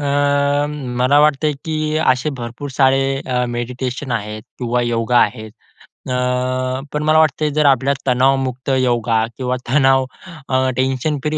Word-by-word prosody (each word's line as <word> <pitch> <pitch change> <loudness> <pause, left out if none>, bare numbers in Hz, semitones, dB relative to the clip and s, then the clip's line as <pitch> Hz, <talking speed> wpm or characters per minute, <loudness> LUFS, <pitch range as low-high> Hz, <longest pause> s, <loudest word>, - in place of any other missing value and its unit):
अ, - - -4 0.9
मला 130 +4 +4
वाटतं, 150 0 +3
की 155 -1 -1
असे 130 -1 +1
भरपूर 120 +5 -6
सारे 135 0 +3 0.3
अ, 125 -1 0
मेडिटेशन 125 +2 -4
आहेत 105 -1 -4 0.2
किंवा 125 0 0
योगा 120 0 +1
आहेत. 110 -2 -1 0.6
अ, 125 - -1 0.8
पण 150 - -1
मला 155 +1 +4
वाटतं 155 -1 +2
जर 155 -1 +2
आपल्या 135 0 +3
तणावमुक्त 130 0 +1
योगा 120 -2 +1
किंवा 125 -1 -1
तणाव 135 -1 +3 0.4
अ, 130 0 +2
टेन्शन 130 +3 0
फ्री 155 0 -1
130 Hz, 135 wpm, -18 LUFS, 125-145 Hz, 0.9 s, मला